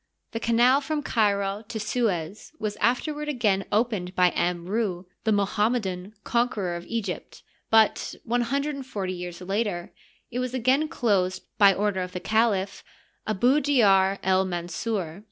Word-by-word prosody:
The 225 Hz, -, -3 dB
canal 240 Hz, +4 st, +4 dB
from 300 Hz, 0 st, -2 dB
Cairo 200 Hz, -4 st, +1 dB
to 220 Hz, -, -5 dB
Suez 210 Hz, -, -2 dB
was 215 Hz, -5 st, -3 dB
afterwards 295 Hz, +6 st, 0 dB
again 210 Hz, -8 st, +1 dB
opened 205 Hz, -5 st, 0 dB
by 180 Hz, -1 st, +4 dB
Amru, 180 Hz, +2 st, -1 dB, 0.2 s
the 220 Hz, -, +3 dB
Moham 205 Hz, +2 st, +2 dB
medan 195 Hz, -3 st, -4 dB
conqueror 225 Hz, -7 st, 0 dB
of 170 Hz, -, -8 dB
Egypt, 215 Hz, -6 st, -5 dB, 0.3 s
but, 220 Hz, -1 st, +3 dB
one 240 Hz, +2 st, 0 dB
hundred 280 Hz, +5 st, -1 dB
and 275 Hz, -1 st, -6 dB
forty 195 Hz, -7 st, -3 dB
years 180 Hz, 0 st, -7 dB
later, 195 Hz, -2 st, -2 dB, 0.4 s
it 245 Hz, -, -2 dB
was 255 Hz, 0 st, -2 dB
again 260 Hz, +5 st, +2 dB
closed 195 Hz, -, 0 dB, 0.2 s
by 200 Hz, -1 st, +8 dB
order 200 Hz, -1 st, 0 dB
of 180 Hz, 0 st, -5 dB
the 180 Hz, -, -3 dB
caliph 210 Hz, -2 st, +1 dB, 0.4 s
Abu 240 Hz, +7 st, +3 dB
Djar 200 Hz, -9 st, +4 dB
el 190 Hz, 0 st, +3 dB
Mansur. 175 Hz, 0 st, -3 dB
210 Hz, 150 wpm, -26 LUFS, 185-240 Hz, 0.4 s, by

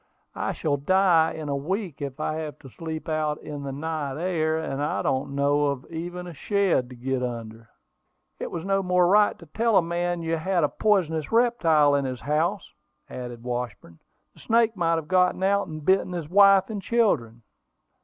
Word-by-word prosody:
"I -, -, -2 dB
shall 145 Hz, -2 st, -1 dB
die 170 Hz, +1 st, +3 dB
in 155 Hz, -1 st, -6 dB
a 140 Hz, -, -1 dB
week, 175 Hz, +3 st, -3 dB
if 140 Hz, 0 st, -5 dB
I 155 Hz, 0 st, -2 dB
have 155 Hz, -2 st, -5 dB
to 135 Hz, -, -12 dB
sleep 160 Hz, +2 st, -6 dB
out 155 Hz, -1 st, -1 dB
in 145 Hz, -1 st, -6 dB
the 140 Hz, -1 st, -5 dB
night 145 Hz, -1 st, -4 dB
air: 160 Hz, -3 st, 0 dB
and 145 Hz, -3 st, -3 dB
I 150 Hz, -, -1 dB
don't 135 Hz, +1 st, -1 dB
know 145 Hz, +1 st, +2 dB
of 140 Hz, -2 st, -3 dB
even 175 Hz, +2 st, -5 dB
a 175 Hz, -, -8 dB
shed 185 Hz, -, 0 dB
to 125 Hz, -, -10 dB
get 130 Hz, +1 st, -2 dB
under." 115 Hz, -2 st, -6 dB, 0.7 s
"It -, -, -4 dB
was 170 Hz, 0 st, -5 dB
no 195 Hz, 0 st, +1 dB
more 180 Hz, -1 st, +2 dB
than 175 Hz, -, +3 dB
right 210 Hz, 0 st, +4 dB
to 170 Hz, -, -14 dB
tell 220 Hz, +6 st, +1 dB
a -, -, +6 dB
man 175 Hz, 0 st, -2 dB
you 165 Hz, 0 st, -1 dB
had 175 Hz, +1 st, 0 dB
a 145 Hz, -, +2 dB
poisonous 165 Hz, -8 st, 0 dB
reptile 165 Hz, -12 st, +3 dB
in 140 Hz, -1 st, +1 dB
his 130 Hz, -2 st, -4 dB
house," 150 Hz, +6 st, -1 dB, 0.4 s
added 120 Hz, -2 st, -7 dB
Washburn. 120 Hz, -9 st, -5 dB, 0.3 s
"The -, -, -20 dB
snake 230 Hz, -1 st, +2 dB
might 165 Hz, -3 st, +1 dB
have 160 Hz, -2 st, -4 dB
got 185 Hz, 0 st, +2 dB
out, 200 Hz, +1 st, +2 dB
and 155 Hz, -2 st, -8 dB
bitten 190 Hz, 0 st, +2 dB
his 170 Hz, -4 st, -4 dB
wife 195 Hz, +1 st, +5 dB
and 205 Hz, -2 st, -4 dB
children." 125 Hz, -, 0 dB
160 Hz, 195 wpm, -25 LUFS, 140-185 Hz, 0.7 s, a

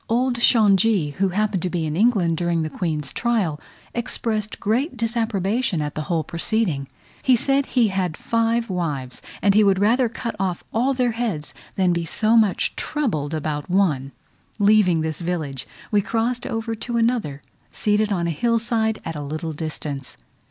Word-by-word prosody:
Old 245 Hz, +1 st, +1 dB
Shongi, 210 Hz, -, +4 dB
who 195 Hz, 0 st, +2 dB
happened 205 Hz, 0 st, 0 dB
to 180 Hz, -, -1 dB
be 170 Hz, -2 st, -1 dB
in 155 Hz, 0 st, -2 dB
England 195 Hz, -5 st, +3 dB
during 170 Hz, -1 st, 0 dB
the 155 Hz, -, -4 dB
Queen's 155 Hz, -5 st, -3 dB
trial, 210 Hz, -11 st, 0 dB, 0.3 s
expressed 220 Hz, -3 st, -2 dB
great 245 Hz, +7 st, 0 dB
disapprobation 225 Hz, -3 st, 0 dB
at 150 Hz, -1 st, -2 dB
the 155 Hz, -, -3 dB
whole 165 Hz, -3 st, +1 dB
proceeding: 170 Hz, -3 st, -1 dB, 0.3 s
he 260 Hz, -, +4 dB
said 275 Hz, +3 st, +1 dB
he 235 Hz, -4 st, +3 dB
had 185 Hz, -4 st, -1 dB
five 230 Hz, 0 st, 0 dB
wives, 150 Hz, -9 st, -3 dB, 0.2 s
and 200 Hz, -, +5 dB
he 215 Hz, +1 st, +5 dB
would 195 Hz, -2 st, +4 dB
rather 230 Hz, +5 st, +3 dB
cut 235 Hz, 0 st, -5 dB
off 185 Hz, -2 st, -1 dB
all 255 Hz, +4 st, +2 dB
their 250 Hz, -2 st, +1 dB
heads 220 Hz, -10 st, -3 dB, 0.2 s
than 185 Hz, -2 st, +2 dB
be 170 Hz, 0 st, -1 dB
so 215 Hz, +7 st, +2 dB
much 215 Hz, -5 st, +2 dB
troubled 160 Hz, -, -1 dB
about 150 Hz, 0 st, -3 dB
one. 155 Hz, -8 st, +1 dB, 0.5 s
Leaving 200 Hz, -5 st, +4 dB
this 160 Hz, +1 st, -2 dB
village, 155 Hz, -7 st, -3 dB, 0.2 s
we 205 Hz, -1 st, +4 dB
crossed 235 Hz, +4 st, -1 dB
over 225 Hz, 0 st, -2 dB
to 235 Hz, +2 st, -3 dB
another, 230 Hz, -, 0 dB, 0.3 s
seated 210 Hz, 0 st, +1 dB
on 175 Hz, -4 st, 0 dB
a 170 Hz, -, 0 dB
hill 230 Hz, +9 st, +1 dB
side 220 Hz, -1 st, +1 dB
at 165 Hz, -, -4 dB
a 150 Hz, -, -4 dB
little 155 Hz, +3 st, -4 dB
distance. 150 Hz, -3 st, -5 dB
200 Hz, 170 wpm, -22 LUFS, 165-230 Hz, 0.5 s, and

